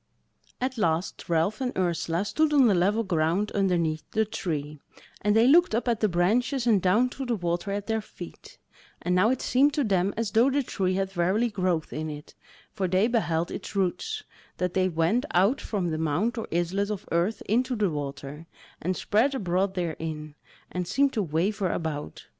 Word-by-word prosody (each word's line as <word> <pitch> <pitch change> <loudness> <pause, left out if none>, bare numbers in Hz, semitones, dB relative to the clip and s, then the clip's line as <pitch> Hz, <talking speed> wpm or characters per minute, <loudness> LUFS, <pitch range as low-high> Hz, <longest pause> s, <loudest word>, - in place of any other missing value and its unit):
At 255 -1 -2
last 165 -2 -1
Ralph 170 +8 +1
and 255 -1 -2
Ursula 175 0 0
stood 310 +7 +1
on 280 -3 +6
the 215 - +5
level 200 +5 +2
ground 175 +2 0
underneath 170 -5 0
the 220 0 +1
Tree, 150 -7 -4 0.4
and 210 +1 +2
they 225 +1 +5
looked 330 -3 +5
up 240 - -1
at 235 -3 +1
the 215 - +2
branches, 235 +9 +1
and 215 -5 +4
down 210 +8 +3
to 270 - -6
the 245 -2 0
water 175 0 -2
at 200 0 -2
their 220 -1 -1
feet; - - -11 0.5
and 180 - 0
now 185 +5 +4
it 260 0 -1
seemed 280 +4 +3
to 295 - +2
them 195 -3 +1
as 225 -3 -1
though 235 +4 +4
the 280 +1 +1
Tree 185 -6 -1
had 195 0 -1
verily 195 +6 +1
growth 185 -5 -1
in 155 0 -3
it, 150 0 -9 0.4
for 195 -3 -1
they 185 +3 +3
beheld 175 -9 0
its 205 - -7
roots, 430 - -1 0.3
that 180 -1 -1
they 185 0 +2
went 175 - +1
out 200 +10 +3
from 185 -6 -2
the 155 - -2
mound 160 - 0
or 225 - -4
islet 180 +4 0
of 210 -3 -5
earth 175 +6 0
into 250 +4 +1
the 205 -5 +1
water, 145 +1 -6 0.3
and 185 +2 -1
spread 245 +7 +2
abroad 190 -3 0
therein, 160 -3 -4 0.4
and 180 -1 -3
seemed 275 +8 +2
to 220 - 0
waver 185 +4 0
about. 145 - -4
190 Hz, 190 wpm, -27 LUFS, 170-225 Hz, 0.5 s, on